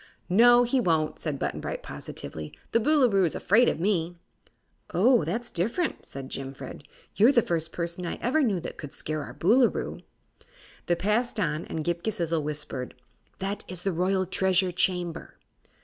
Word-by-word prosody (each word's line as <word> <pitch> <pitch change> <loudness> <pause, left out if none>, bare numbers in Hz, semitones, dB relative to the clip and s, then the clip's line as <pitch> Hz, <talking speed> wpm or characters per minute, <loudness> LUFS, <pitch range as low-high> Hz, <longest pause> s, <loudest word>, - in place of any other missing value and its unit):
"No, 240 +5 +7
he 245 +2 +2
won't," 160 -8 +1
said 150 -4 -3
Button - - -2
Bright, - - -5
positively. 75 -1 -7 0.2
"The 230 - +3
Boolooroo's 230 - +3
afraid 230 +6 +4
of - - -3
me." 175 -2 0 0.8
"Oh, 235 +2 +5
that's 230 +10 -3
different," 230 - -1
said 135 -1 -7
Jimfred. 135 +1 -7 0.3
"You're 225 +6 +6
the 235 -5 +4
first 165 -1 -2
person 170 +1 -3
I - - -3
ever 265 +6 +1
knew 210 -9 +1
that - - -7
could 145 -3 -8
scare 155 0 -3
our 125 - -8
Boolooroo." 225 - +2 0.9
They 175 - +3
passed 210 +6 0
on, 160 -5 -1
and 160 - -4
Ghip 175 0 -1
Ghisizzle 170 -6 0
whispered: 145 -4 -4 0.4
"That 195 +2 -3
is 180 -1 -6
the 195 - 0
Royal 185 +2 +1
Treasure 190 0 +2
Chamber." 175 -1 -1
180 Hz, 160 wpm, -27 LUFS, 160-220 Hz, 0.9 s, No